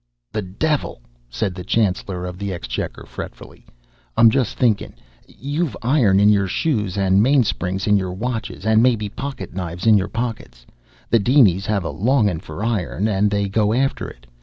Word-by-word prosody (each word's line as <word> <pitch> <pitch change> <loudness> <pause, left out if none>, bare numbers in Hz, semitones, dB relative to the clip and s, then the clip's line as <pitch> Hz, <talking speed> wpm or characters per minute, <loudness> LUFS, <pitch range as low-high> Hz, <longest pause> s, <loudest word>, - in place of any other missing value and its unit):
"The 105 - -2
devil!" 100 - -2 0.3
said 95 - -2
the 90 0 -7
Chancellor 95 -4 -1
of 90 0 -7
the 100 -1 -3
Exchequer, 85 - -5
fretfully. - - -10 0.5
"I'm 115 -1 +7
just 130 -3 0
thinkin'. 110 -5 +1 0.3
You've 145 +3 -3
iron 115 -7 +3
in 105 +1 +5
your 100 -2 +3
shoes 105 - -1
and 95 0 +3
mainsprings 105 -7 +1
in 105 -1 +4
your 95 -2 -2
watches 110 +1 -4
and 110 0 +4
maybe 115 -4 +2
pocket 135 -6 -6
knives 90 0 -5
in 110 -2 +6
your 95 - -2
pockets. 110 - -5 0.5
The 115 - +5
dinies 100 -6 +4
have 105 -3 0
a - - -3
longin' 105 - +1
for 100 - -7
iron, 105 -2 -1
and 105 0 +2
they 100 0 0
go 105 +2 +1
after 135 +2 0
it. - - -16
105 Hz, 170 wpm, -21 LUFS, 95-120 Hz, 0.5 s, I'm